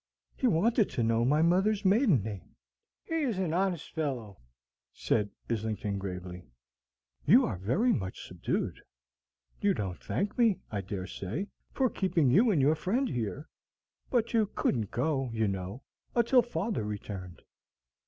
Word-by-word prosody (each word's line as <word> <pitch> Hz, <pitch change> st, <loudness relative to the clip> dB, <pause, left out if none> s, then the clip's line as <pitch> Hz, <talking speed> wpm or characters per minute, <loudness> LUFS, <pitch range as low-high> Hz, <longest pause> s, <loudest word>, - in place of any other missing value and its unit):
He 260 Hz, -, +1 dB
wanted 220 Hz, +3 st, +3 dB
to 120 Hz, -, -1 dB
know 115 Hz, 0 st, +2 dB
my 150 Hz, +6 st, +3 dB
mother's 195 Hz, +5 st, +2 dB
maiden 195 Hz, -, +4 dB
name." 100 Hz, -4 st, -7 dB, 0.5 s
"He 325 Hz, -, -2 dB
is 245 Hz, -9 st, 0 dB
an 180 Hz, -4 st, -1 dB
honest 180 Hz, -3 st, -1 dB
fellow," 125 Hz, -, -3 dB, 0.5 s
said 105 Hz, -2 st, 0 dB, 0.2 s
Islington, 110 Hz, -3 st, -2 dB
gravely. 90 Hz, -2 st, -6 dB, 0.8 s
"You -, -, +7 dB
are -, -, -3 dB
very 185 Hz, -, +2 dB
much 95 Hz, -5 st, -4 dB
subdued. -, -, -2 dB, 0.8 s
You 200 Hz, -2 st, +3 dB
don't 95 Hz, -4 st, -4 dB
thank 200 Hz, +5 st, -2 dB
me, 225 Hz, -5 st, +4 dB
I 105 Hz, -2 st, -2 dB
dare 95 Hz, -1 st, -5 dB
say, 100 Hz, -, -4 dB, 0.2 s
for 265 Hz, -, +2 dB
keeping 170 Hz, -, +1 dB
you 220 Hz, -, +5 dB
and 185 Hz, -8 st, +3 dB
your 140 Hz, +3 st, +4 dB
friend 200 Hz, -, 0 dB
here; 120 Hz, +6 st, -3 dB, 0.6 s
but 235 Hz, -2 st, +1 dB
you 220 Hz, -2 st, +3 dB
couldn't 110 Hz, -6 st, 0 dB
go, 135 Hz, 0 st, 0 dB
you 110 Hz, -1 st, +2 dB
know, 95 Hz, +6 st, -4 dB, 0.3 s
until 240 Hz, +2 st, +5 dB
father 215 Hz, -, -2 dB
returned." 100 Hz, -4 st, -6 dB
145 Hz, 145 wpm, -30 LUFS, -, 0.8 s, You